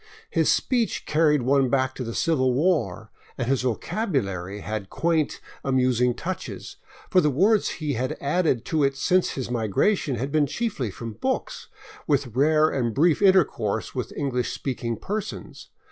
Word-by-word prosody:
His - - +3
speech 240 -4 0
carried 150 -3 +3
one 135 0 +3
back 130 0 +1
to 130 - -5
the 115 -1 -5
Civil 130 -6 +2
War, 120 - 0 0.3
and 120 - -2
his 135 0 +1
vocabulary 110 - -2
had 105 -3 -5
quaint, 165 -3 0 0.2
amusing 125 -2 +2
touches; 185 +7 -6 0.3
for 185 - +5
the 150 - +2
words 195 - +3
he 150 -3 -2
had 130 +2 -2
added 145 -4 0
to 155 -3 +1
it 135 0 +2
since 185 +5 +2
his 130 -2 -4
migration 125 - +1
had 135 +5 -3
been 150 -1 +2
chiefly 155 - -2
from 115 +3 -7
books, - - -3 0.4
with 135 -5 0
rare 155 +3 +4
and 120 -7 -1
brief 160 +5 +3
intercourse 150 - +2
with 125 -4 -4
English 125 -4 -1
speaking 120 -4 -3
persons. 210 - -6
135 Hz, 155 wpm, -25 LUFS, 120-160 Hz, 0.4 s, for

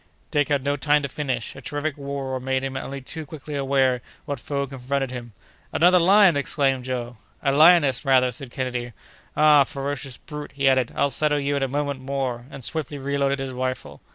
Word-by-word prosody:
—" - - -38
Dick 145 -2 +1
had 140 -2 +1
no 140 +1 +1
time 145 +1 +2
to - - -1
finish; 130 -4 -3
a 135 - -10
terrific 145 +4 -3
roar 140 -2 -4
made 130 +1 -1
him 135 0 -4
only 135 +1 -5
too 160 +5 -6
quickly 150 0 -9
aware 135 -3 +1 0.2
what 145 -4 -4
foe 140 +2 -2
confronted 135 0 -3
him. 120 -3 -7 0.4
"Another 180 +2 +5
lion!" 190 0 +6
exclaimed 135 -2 0
Joe. 120 -2 -4 0.3
"A 140 - +3
lioness, 150 -3 +5
rather," 130 -2 +4
said 130 +2 -7
Kennedy. 125 -1 -4 0.4
"Ah! 150 -2 +7
ferocious 135 -2 -5
brute!" 150 -1 -8
he 140 -1 +1
added, 130 -2 +3
"I'll 140 - +1
settle 150 +3 +1
you 140 0 0
in 140 - -1
a 135 - +1
moment 140 0 -2
more!" 130 -2 -3
and 135 -2 -9
swiftly 150 +1 -3
reloaded 140 0 0
his 135 -1 -4
rifle. 130 0 -4
140 Hz, 195 wpm, -24 LUFS, 130-145 Hz, 0.4 s, Ah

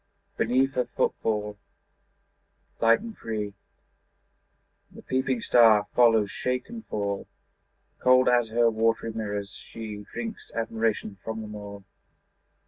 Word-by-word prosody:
Beneath 130 +3 +2
her 125 -1 0
footfall 105 -3 -1 1.2
light 115 0 +4
and 225 -1 -8
free 105 -2 -4 1.4
The - - -14
peeping 130 -2 -1
star 110 -3 +6
follows 115 -4 +4
shake 125 0 -2
and 230 -1 -8
fall; 100 -1 -3 0.7
Cold 130 0 +5
as 120 -2 +3
her 120 +1 +3
watery 115 +1 +1
mirrors, 105 -2 -4
she 105 -1 -8
Drinks 225 -2 -6
admiration 110 -3 -1
from 110 0 -4
them 105 0 -8
all. 100 -1 -8
115 Hz, 115 wpm, -27 LUFS, 105-125 Hz, 1.4 s, star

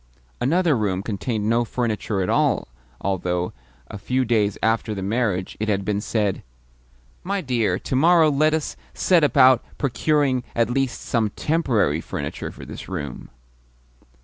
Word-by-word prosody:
Another 165 +4 +2
room 100 -4 -1
contained 105 +1 -2
no 115 +2 +3
furniture 110 -4 -2
at - - -2
all, - - +2 0.3
although, 90 -2 -1 0.3
a 100 - -8
few 130 +5 0
days 105 -4 +1
after 110 -1 +1
the 95 - -4
marriage, 100 -3 -1
it 110 +1 -1
had 100 -2 0
been 105 -1 0
said: 105 -3 -1 0.8
"My 200 +2 -1
dear, 125 - 0
to - - -4
morrow 160 +2 +5
let 155 +2 +3
us 160 - -3 0.2
set 175 -4 +3
about 130 -3 +5
procuring 140 -1 +1
at 115 0 +1
least 135 0 -1
some 115 -3 0
TEMPORARY 115 - 0
furniture - - -5
for - - -11
this - - -9
room." 75 -9 -6
115 Hz, 150 wpm, -23 LUFS, 100-135 Hz, 0.8 s, morrow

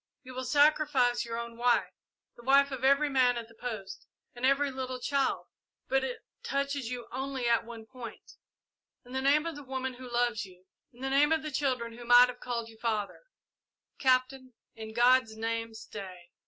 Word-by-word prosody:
You 255 -1 -10
will 255 0 -4
sacrifice 285 -3 +3
your 230 0 -4
own 235 0 -6
wife, 240 0 +2 0.4
the - - -14
wife 275 +3 +4
of 260 -1 -5
every 280 +3 +4
man 255 -3 +3
at 230 -1 -5
the 230 - -18
post, 220 -5 -7 0.3
and 245 - -11
every 275 +1 +2
little 260 -1 -4
child, 275 +2 0 0.4
but 270 0 +2
it 255 -2 -5 0.2
touches 280 -3 -2
you 245 -2 -5
only 265 0 -3
at 235 -1 +2
one 230 -1 -9
point. 245 0 -11 0.7
In 245 - -14
the 265 - -1
name 290 +3 +3
of 335 -2 -4
the 290 - -8
woman 260 -1 -4
who 250 0 -10
loves 240 -2 +1
you 185 -1 -14 0.3
in 245 - -18
the 270 0 -2
name 290 +3 +4
of 320 -1 +2
the 305 - -4
children 255 -5 -1
who - - -8
might 245 +1 +7
have 250 0 -8
called 235 -2 -3
you 225 -1 -15
father 215 -4 -2 0.8
Captain 255 0 +1 0.2
in 220 -1 -8
God's 240 -1 +4
name 225 0 -3
stay!" 185 -5 -9
250 Hz, 190 wpm, -30 LUFS, 235-270 Hz, 0.8 s, might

